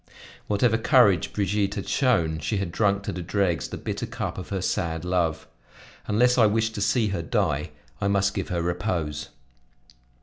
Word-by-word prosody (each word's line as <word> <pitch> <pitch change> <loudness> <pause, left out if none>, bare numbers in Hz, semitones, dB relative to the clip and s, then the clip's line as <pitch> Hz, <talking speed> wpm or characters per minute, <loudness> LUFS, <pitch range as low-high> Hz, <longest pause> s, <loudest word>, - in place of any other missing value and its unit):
Whatever 110 +2 +2
courage 115 - +4
Brigitte 100 0 0
had 100 - -5
shown, 85 - +1
she 105 +7 -2
had 95 -3 -2
drunk 100 0 +1
to - - -3
the 90 - -5
dregs 90 -1 0
the - - -6
bitter - - -4
cup - - -4
of 90 - -8
her 100 - -2
sad 85 -2 -2
love: 85 -3 0 0.6
unless 125 +4 +3
I 110 - +7
wished 110 +1 0
to 100 - -4
see 110 +1 +2
her 95 -4 -2
die, 85 -5 0 0.3
I 100 - +1
must 100 0 +2
give 95 - -3
her 85 -2 -1
repose. 85 -4 -2
100 Hz, 175 wpm, -25 LUFS, 85-105 Hz, 0.6 s, I